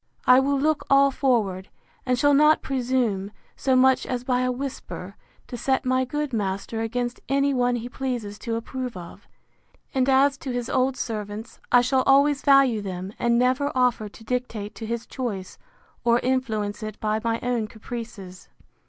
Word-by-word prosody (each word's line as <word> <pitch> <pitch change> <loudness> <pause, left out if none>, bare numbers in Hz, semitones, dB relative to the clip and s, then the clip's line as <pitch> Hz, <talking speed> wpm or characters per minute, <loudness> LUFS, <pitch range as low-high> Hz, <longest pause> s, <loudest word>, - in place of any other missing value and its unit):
I 255 +1 +7
will 275 +1 +1
look 310 +1 +1
all 275 0 +5
forward: 210 -9 0 0.4
and 250 0 +2
shall 290 +3 +4
not 300 +2 +5
presume, 245 -7 -1 0.3
so 260 -1 +1
much 260 0 +4
as 245 -1 -3
by 250 -1 +1
a 255 0 +1
whisper, 250 -7 -6 0.3
to - - -8
set 265 +3 0
my 255 0 +2
good 295 +1 -3
master 200 +1 -2
against 240 +2 -2
any 275 +1 +2
one 245 -1 +1
he 240 0 -4
pleases 245 -5 -4
to 230 -2 -3
approve 250 0 -5
of: 170 -1 -11 0.7
And 265 0 +1
as 275 +1 +4
to 265 - -5
his 245 -1 -3
old 260 +1 +1
servants, 215 0 -5
I 245 - +7
shall 260 +2 +2
always 280 +1 +4
value 275 -6 +4
them, 190 0 -6
and 235 0 +2
never 255 +4 +2
offer 245 -4 +1
to 225 - -15
dictate 230 -4 -3
to 225 - -7
his 235 0 -3
choice, 210 -8 -5 0.4
or 235 0 +4
influence 225 -5 -1
it 215 -1 -6
by 215 0 0
my 230 0 0
own 245 -3 -1
caprices. 220 -5 -9
245 Hz, 170 wpm, -24 LUFS, 220-265 Hz, 0.7 s, I